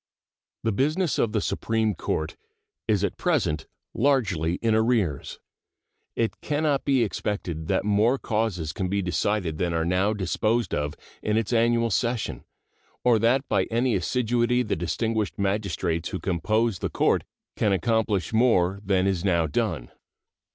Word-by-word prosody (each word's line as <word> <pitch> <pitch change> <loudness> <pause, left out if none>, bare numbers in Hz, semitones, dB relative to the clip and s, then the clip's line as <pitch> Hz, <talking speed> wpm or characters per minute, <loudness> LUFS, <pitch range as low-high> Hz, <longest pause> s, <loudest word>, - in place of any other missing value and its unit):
The 115 - +1
business 155 - 0
of 110 - +2
the 105 - 0
Supreme 110 0 0
Court 80 -4 -3 0.5
is 105 -2 +2
at - - -1
present 105 - 0 0.3
largely 100 - +1
in 115 +2 0
arrears. 110 - +1 0.8
It 115 -1 -1
can 150 +1 -1
not 145 -3 +1
be 135 -4 +3
expected 90 -6 -3
that - - +1
more 105 +5 +3
causes 105 - -2
can 95 -4 -2
be 100 +1 0
decided 90 -2 -1
than 85 -2 0
are 80 0 0
now 95 +4 +2
disposed 110 +4 0
of 75 0 -1 0.3
in 105 0 0
its 115 +1 -1
annual 115 0 +2
session, 120 -3 -1 0.6
or 120 -3 +4
that 130 +5 +2
by 95 -2 +2
any 120 +2 0
assiduity 120 +4 +1
the 105 - -1
distinguished 110 +6 -1
magistrates 95 -4 -1
who 95 - -4
compose 105 +4 0
the - - -2
court - - +2 0.3
can 105 - +1
accomplish 105 +1 0
more 100 -5 +3
than 95 -2 +2
is 95 -3 0
now 85 -4 +2
done. 65 -4 -2
105 Hz, 150 wpm, -25 LUFS, 90-115 Hz, 0.8 s, or